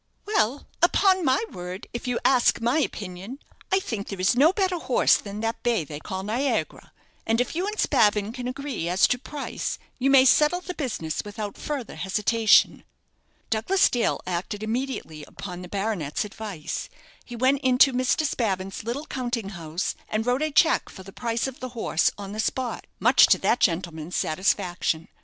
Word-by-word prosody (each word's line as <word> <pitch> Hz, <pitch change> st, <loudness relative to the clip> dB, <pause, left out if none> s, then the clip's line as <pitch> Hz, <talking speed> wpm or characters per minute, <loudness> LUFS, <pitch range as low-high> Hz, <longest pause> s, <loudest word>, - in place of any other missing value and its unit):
"Well, 285 Hz, -, 0 dB, 0.2 s
upon 375 Hz, +1 st, +4 dB
my 270 Hz, -, +2 dB
word, 180 Hz, +1 st, -7 dB
if 240 Hz, +1 st, -5 dB
you 245 Hz, -1 st, 0 dB
ask 255 Hz, -3 st, +4 dB
my 240 Hz, +6 st, +1 dB
opinion, 200 Hz, -2 st, -4 dB, 0.3 s
I 385 Hz, -, +4 dB
think 225 Hz, -, -5 dB
there 195 Hz, -, -6 dB
is 190 Hz, +6 st, +3 dB
no 290 Hz, +7 st, +6 dB
better 375 Hz, -3 st, 0 dB
horse 260 Hz, -, +3 dB
than 205 Hz, +1 st, -5 dB
that 225 Hz, 0 st, -2 dB
bay 235 Hz, -8 st, +1 dB
they 150 Hz, 0 st, -8 dB
call 190 Hz, +4 st, -5 dB
'Niagara;' 240 Hz, +7 st, -2 dB, 0.4 s
and 225 Hz, +1 st, +2 dB
if 245 Hz, +5 st, -1 dB
you 365 Hz, +4 st, -1 dB
and 425 Hz, +1 st, -4 dB
Spavin 210 Hz, +1 st, +2 dB
can 250 Hz, -1 st, -5 dB
agree 260 Hz, -, -4 dB
as 180 Hz, +2 st, +4 dB
to 250 Hz, -, +1 dB
price, 285 Hz, +2 st, -4 dB, 0.2 s
you 265 Hz, +2 st, +2 dB
may 270 Hz, -1 st, +7 dB
settle 300 Hz, +6 st, +4 dB
the 360 Hz, 0 st, -6 dB
business 215 Hz, -, -3 dB
without 205 Hz, 0 st, -6 dB
further 280 Hz, -6 st, -5 dB
hesitation." 210 Hz, +3 st, +3 dB, 0.7 s
Douglas 230 Hz, -, +3 dB
Dale 240 Hz, -2 st, +1 dB
acted 185 Hz, +4 st, -3 dB
immediately 220 Hz, -, -3 dB
upon 180 Hz, -2 st, -8 dB
the 180 Hz, -, -9 dB
baronet's 195 Hz, -6 st, -2 dB
advice. 205 Hz, -6 st, -6 dB, 0.3 s
He 240 Hz, -, -9 dB
went 260 Hz, +3 st, +2 dB
into 260 Hz, +1 st, +5 dB
Mr. 255 Hz, +5 st, +1 dB
Spavin's 195 Hz, -9 st, -2 dB
little 245 Hz, +7 st, -4 dB
counting 240 Hz, -7 st, -3 dB
house, 170 Hz, -2 st, -3 dB, 0.2 s
and 215 Hz, +1 st, -1 dB
wrote 250 Hz, +3 st, +1 dB
a 310 Hz, -, +1 dB
cheque 315 Hz, +2 st, +3 dB
for 190 Hz, -, -11 dB
the 195 Hz, +1 st, -12 dB
price 230 Hz, -1 st, -2 dB
of 265 Hz, -1 st, -6 dB
the 255 Hz, -, -5 dB
horse 165 Hz, -7 st, +2 dB
on 200 Hz, -1 st, -7 dB
the 215 Hz, -, -6 dB
spot, 250 Hz, +2 st, -2 dB
much -, -, +6 dB
to -, -, +5 dB
that 245 Hz, -, +1 dB
gentleman's 170 Hz, -2 st, -1 dB
satisfaction. 175 Hz, -1 st, 0 dB
230 Hz, 175 wpm, -25 LUFS, 195-265 Hz, 0.7 s, may